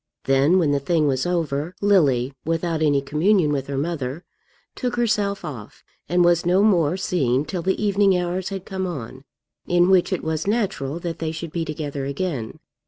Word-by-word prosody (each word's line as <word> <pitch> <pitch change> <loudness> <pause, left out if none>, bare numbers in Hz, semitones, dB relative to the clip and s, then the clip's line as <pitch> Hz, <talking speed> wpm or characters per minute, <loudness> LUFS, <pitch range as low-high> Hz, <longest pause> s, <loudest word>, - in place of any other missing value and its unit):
Then, 135 +6 +3
when 160 -6 +2
the 140 - +2
thing 155 +2 +1
was 135 +1 0
over, 165 -1 -2
Lily, 140 -11 +3
without 165 0 -1
any 145 -3 +2
communion 155 +3 +2
with 135 -2 -2
her 140 -1 -3
mother, 145 0 -3 0.5
took 250 -2 -3
herself 205 -5 0
off, 125 -10 -9 0.3
and 175 +1 +3
was 175 -1 +3
no 180 +3 +3
more 175 -5 +3
seen 140 -8 0
till 175 +3 -4
the 190 +3 0
evening 200 -2 +3
hours 180 +1 -2
had 195 -2 -6
come 190 -1 -3
on, 130 -4 -7 0.4
in 175 +1 +3
which 185 0 +4
it 185 - -2
was 160 +2 -2
natural 200 - -1
that 170 -1 -4
they 160 -1 -2
should 160 0 -6
be 170 0 -2
together 150 -3 -4
again. 140 -5 -3
165 Hz, 180 wpm, -22 LUFS, 145-185 Hz, 0.5 s, which